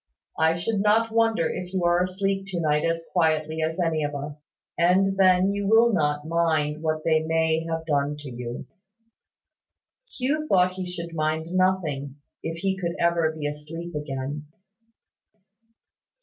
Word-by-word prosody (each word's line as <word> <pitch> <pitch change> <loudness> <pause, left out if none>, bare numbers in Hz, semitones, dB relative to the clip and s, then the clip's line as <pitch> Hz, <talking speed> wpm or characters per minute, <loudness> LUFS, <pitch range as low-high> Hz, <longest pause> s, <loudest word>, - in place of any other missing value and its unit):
I 160 +1 +3
should 195 +4 -1
not 220 +2 +3
wonder 225 -7 +2
if 180 +1 -5
you 185 - 0
are 175 +1 +3
asleep 195 +1 -1
to 185 -3 -3
night 150 -2 +1
as 165 0 -1
quietly 160 -2 +1
as 160 +3 -2
any 165 -3 +1
of 145 0 -3
us; 145 +1 -7 0.3
and 190 +3 +3
then 185 0 +4
you 200 0 -2
will 225 +2 +5
not 150 -3 0
mind 160 -2 0
what 155 -1 -1
they 160 -1 +3
may 160 0 +1
have 165 0 -3
done 145 -1 0
to 145 -3 -8
you." 120 0 -6 1.5
Hugh 300 +4 -1
thought 185 -5 +4
he 185 -1 -6
should 170 -1 -6
mind 160 +1 -1
nothing, 160 -7 0 0.3
if 165 0 -4
he 195 -1 0
could 170 -3 -3
ever 170 -2 +2
be 155 -2 -6
asleep 155 +4 -6
again. 145 0 -5
165 Hz, 155 wpm, -25 LUFS, 155-185 Hz, 1.5 s, will